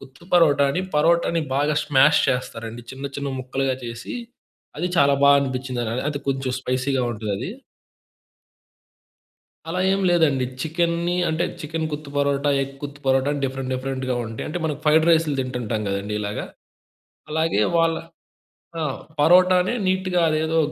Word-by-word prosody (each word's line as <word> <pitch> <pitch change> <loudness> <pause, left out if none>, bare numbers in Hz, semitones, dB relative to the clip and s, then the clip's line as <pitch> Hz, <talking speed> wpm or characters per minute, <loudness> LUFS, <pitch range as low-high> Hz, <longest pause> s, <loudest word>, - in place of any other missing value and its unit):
కుత్తు 135 +5 -15
పరోటా 150 -5 +5
అని 180 - 0 0.2
పరోటాని 170 +2 +3
బాగా 145 +2 +1
స్మాష్ 150 +1 +5
చేస్తారండి. 120 -2 -3
చిన్న 135 +1 -8
చిన్న 140 0 -3
ముక్కలుగా 130 +1 -1
చేసి 115 0 -6 0.6
అది 175 - 0
చాలా 140 0 +5
బా 140 - +7
అనిపిచ్చింది. 130 -2 -3
అ - - -2 0.2
అది 145 - -3
కొంచెం 135 -1 -1
స్పైసీగా 130 +1 0
ఉంటదది. 105 -3 -4 2.2
అలా 180 +2 -2
ఏం 195 - 0
లేదండి. 155 -7 +3 0.2
చికెన్‌ని 170 +2 0
అంటే 160 +1 0 0.2
'చికెన్ 160 +1 -3
కుత్తు 150 -1 -6
పరోటా, 140 0 +1
ఎగ్ 135 0 -3
కుత్తు 145 0 -7
పరోటా,' 135 +1 +2
అని 145 - -3
డిఫరెంట్ 135 -1 -3
డిఫరెంట్‌గా 130 0 -2
ఉంటయి. 110 0 -6
అంటే 155 - -3
మనం 155 -2 -1
ఫ్రైడ్ 155 +1 +4
రైస్లు 160 -3 +3
తింటుంటాం 125 -4 -2
గదండీ 100 +1 -3
ఇలాగ. 105 0 -3 0.9
అలాగే 160 -8 +1 0.2
వాళ్ళ 165 0 +3 0.8
ఆ! - - -1 0.4
పరోటానే 180 +5 +5
నీట్‌గా 185 -1 +1
అదేదో 160 +1 +1
140 Hz, 140 wpm, -23 LUFS, 130-160 Hz, 2.2 s, బా